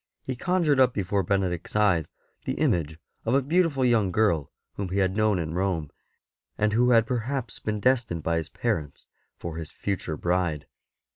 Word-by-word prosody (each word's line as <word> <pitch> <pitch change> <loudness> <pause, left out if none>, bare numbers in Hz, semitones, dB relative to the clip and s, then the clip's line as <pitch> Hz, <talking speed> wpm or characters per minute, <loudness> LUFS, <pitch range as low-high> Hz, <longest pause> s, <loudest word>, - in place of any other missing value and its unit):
He 130 - -3
conjured 165 -1 +1
up 130 -2 +4
before 100 0 0
Benedict's 95 -2 -1
eyes 95 -7 +2 0.3
the - - -1
image 80 -2 0 0.3
of 115 - +1
a 140 - +4
beautiful 155 -3 +2
young 110 -6 +3
girl 90 -7 +1 0.2
whom 100 -2 -4
he 95 - -2
had 95 -1 +1
known 110 -2 +2
in 80 -2 -3
Rome, 90 -5 -1 0.7
and 105 0 +1
who 125 +2 +4
had 115 -2 +5
perhaps 125 +1 -3
been 105 -1 -2
destined 115 -9 +1
by 85 0 +1
his 80 - -3
parents 75 -3 -3 0.3
for 85 -1 -6
his 80 -1 -5
future 95 -6 -3
bride. 85 -4 0
100 Hz, 170 wpm, -26 LUFS, 85-120 Hz, 0.7 s, had